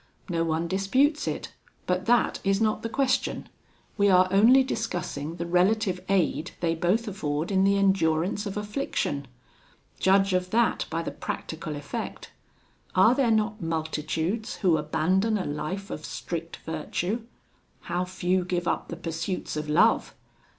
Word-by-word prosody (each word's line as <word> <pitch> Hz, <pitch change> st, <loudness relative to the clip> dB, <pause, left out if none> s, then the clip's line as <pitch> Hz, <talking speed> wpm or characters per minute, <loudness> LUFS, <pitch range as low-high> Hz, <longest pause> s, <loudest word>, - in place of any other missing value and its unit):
No 165 Hz, -2 st, 0 dB
one 165 Hz, +1 st, -1 dB
disputes 255 Hz, -, +2 dB
it, -, -, -4 dB, 0.3 s
but 180 Hz, +2 st, -1 dB
that 240 Hz, 0 st, +3 dB
is 195 Hz, 0 st, +2 dB
not 215 Hz, -1 st, +1 dB
the 230 Hz, -, -3 dB
question 270 Hz, +2 st, 0 dB, 0.5 s
we 200 Hz, 0 st, +5 dB
are 185 Hz, -1 st, +6 dB
only 235 Hz, +7 st, +6 dB
discussing 175 Hz, -, -3 dB
the 170 Hz, -, -4 dB
relative 185 Hz, +2 st, +2 dB
aid 180 Hz, -5 st, +1 dB
they 165 Hz, -1 st, +1 dB
both 185 Hz, +8 st, +1 dB
afford 155 Hz, -4 st, -2 dB
in 190 Hz, -1 st, +3 dB
the 200 Hz, 0 st, +3 dB
endurance 190 Hz, 0 st, +1 dB
of 200 Hz, -, -5 dB
affliction. 210 Hz, -, -2 dB, 0.7 s
Judge 195 Hz, 0 st, +4 dB
of 180 Hz, 0 st, 0 dB
that 230 Hz, +3 st, +1 dB
by 165 Hz, +1 st, -2 dB
the -, -, -4 dB
practical 155 Hz, -1 st, -5 dB
effect: 145 Hz, 0 st, -6 dB, 0.6 s
are 190 Hz, +6 st, +6 dB
there 260 Hz, -2 st, +2 dB
not 215 Hz, -1 st, +1 dB
multitudes 160 Hz, +5 st, -2 dB
who 175 Hz, -3 st, +5 dB
abandon 185 Hz, +8 st, +1 dB
a 190 Hz, -, -3 dB
life 165 Hz, +7 st, -4 dB
of 155 Hz, -, -5 dB
strict 165 Hz, +1 st, -5 dB
virtue? 175 Hz, +7 st, -2 dB, 0.6 s
how 175 Hz, +1 st, -2 dB
few 185 Hz, 0 st, 0 dB
give 175 Hz, -1 st, -2 dB
up -, -, -1 dB
the 170 Hz, -, -6 dB
pursuits 170 Hz, +2 st, -4 dB
of 150 Hz, 0 st, -4 dB
love! 150 Hz, -, +3 dB
185 Hz, 150 wpm, -27 LUFS, 165-210 Hz, 0.7 s, are